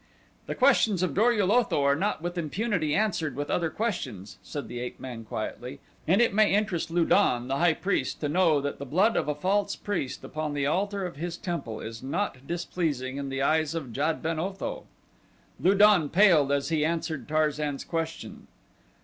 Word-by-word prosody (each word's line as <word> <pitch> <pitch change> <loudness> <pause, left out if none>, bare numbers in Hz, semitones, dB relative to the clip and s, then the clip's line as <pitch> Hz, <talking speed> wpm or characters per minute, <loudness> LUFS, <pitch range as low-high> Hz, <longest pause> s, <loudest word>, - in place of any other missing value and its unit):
"The - - -3
questions 225 -8 +3
of 175 -6 0
Dor 225 +5 +4
ul 205 -4 +1
Otho 235 -11 +2
are 140 0 +4
not 180 0 -1
with 175 0 -3
impunity 170 -1 -1
answered 175 -10 0
with 145 +1 -3
other 170 -2 +1
questions," 130 - -4
said 145 +9 -6
the 120 - -6
ape 125 0 -6
man 125 -3 -7
quietly, 120 +4 -6 0.3
"and 185 +6 +4
it 235 - +1
may 215 0 +4
interest 195 -6 0
Lu 170 0 +2
don, 120 -5 +3
the 135 - 0
high 170 0 +3
priest, 180 -9 -1
to 150 - 0
know 160 -1 +3
that 145 0 -4
the 140 - -5
blood 195 - +3
of - - 0
a 150 - 0
false 195 +6 0
priest 180 -11 -4
upon 155 -1 -4
the 140 -1 0
altar 195 +5 0
of 175 -6 -7
his 170 +2 -4
temple 170 - -4
is 115 0 -7
not 135 -1 -3
displeasing 160 -6 -2
in 140 -1 -4
the 135 0 -2
eyes 155 +1 +1
of 135 -8 -5
Jad 155 +6 -1
ben 160 -1 -1
Otho." 190 +3 -4 0.7
Lu 190 +3 +3
don 200 -7 +5
paled 170 -7 +5
as 140 +1 0
he 155 -2 +1
answered 160 -4 -2
Tarzan's 150 -2 0
question. 160 -8 -5
160 Hz, 190 wpm, -27 LUFS, 140-185 Hz, 0.7 s, don